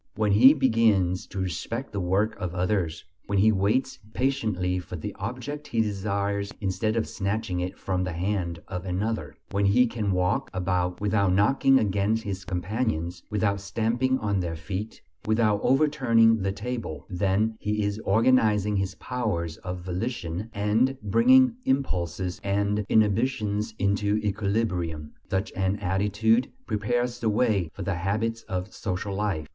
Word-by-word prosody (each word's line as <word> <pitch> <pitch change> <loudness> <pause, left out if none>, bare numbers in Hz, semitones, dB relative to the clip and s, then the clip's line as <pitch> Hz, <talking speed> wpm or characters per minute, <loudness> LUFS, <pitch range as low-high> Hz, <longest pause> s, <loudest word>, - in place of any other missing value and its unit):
When 105 -1 +1
he 130 +9 +8
begins 110 - +2
to - - -9
respect 95 - -3
the 100 - -3
work 95 +4 +1
of 90 -1 -4
others; 90 -3 -1 0.2
when 100 - 0
he 110 +3 +5
waits 105 +7 0 0.2
patiently 110 -9 0
for 90 - -8
the 100 +5 -5
object 125 +8 -5
he 115 - -2
desires 100 -1 -1
instead 110 +3 -1
of 115 - 0
snatching 100 -2 -2
it 90 +1 -4
from 90 -1 -1
the 90 -1 -3
hand 85 -1 -2
of 90 -2 -5
another; 100 +5 -2 0.2
when 100 0 +2
he 125 +6 +5
can 110 -4 -2
walk 90 +9 0
about 90 -1 -1
without 100 -2 +2
knocking 135 +7 +4
against 105 +1 +1
his 100 -1 -5
companions, 90 -3 -2
without 100 -1 0
stamping 115 +6 0
on 100 -5 -1
their 85 -2 -2
feet, 95 +7 -6 0.2
without 110 -2 +2
overturning 125 -6 +4
the 95 +1 0
table 100 - -5
then 100 +4 0
he 105 0 -1
is 100 +1 -1
organizing 105 -2 +3
his 95 0 -2
powers 85 -10 -3
of 90 0 -6
volition, 95 +1 -4
and 110 +6 +1
bringing 250 - +5
impulses 95 - -1
and 100 +1 0
inhibitions 110 0 +1
into 100 0 +1
equilibrium. 100 -7 -1 0.2
Such 95 +3 -1
an 95 +1 0
attitude 105 +5 +1
prepares 120 +3 -1
the 115 - +1
way 105 -6 +1
for 100 - -5
the 100 +2 -1
habits 105 +6 -1
of 95 +1 -3
social 100 0 -3
life. 95 -7 -2
105 Hz, 150 wpm, -26 LUFS, 95-115 Hz, 0.2 s, he